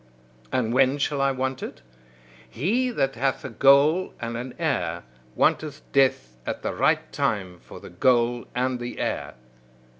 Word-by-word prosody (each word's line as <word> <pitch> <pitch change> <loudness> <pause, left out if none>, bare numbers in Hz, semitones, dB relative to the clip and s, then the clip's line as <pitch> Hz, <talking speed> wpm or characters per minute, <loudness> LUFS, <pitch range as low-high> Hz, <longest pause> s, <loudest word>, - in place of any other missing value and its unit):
And 115 -2 0
when 135 +2 +4
shall 145 -1 -1
I 140 0 +3
want 130 0 -2
it? 60 - -8 0.7
He 220 - 0
that 135 - 0
hath 135 +3 -1
a 130 - -5
goal 140 - +4
and 115 0 -4
an 125 +2 -6
heir, 130 - -1 0.3
wanteth 150 -1 +1
death 130 - +2
at - - -5
the - - -2
right - - +1
time 95 -5 -2
for - - -12
the - - -12
goal 120 +4 +2
and 125 0 0
the 120 0 -6
heir. - - -3
130 Hz, 155 wpm, -25 LUFS, 115-140 Hz, 0.7 s, when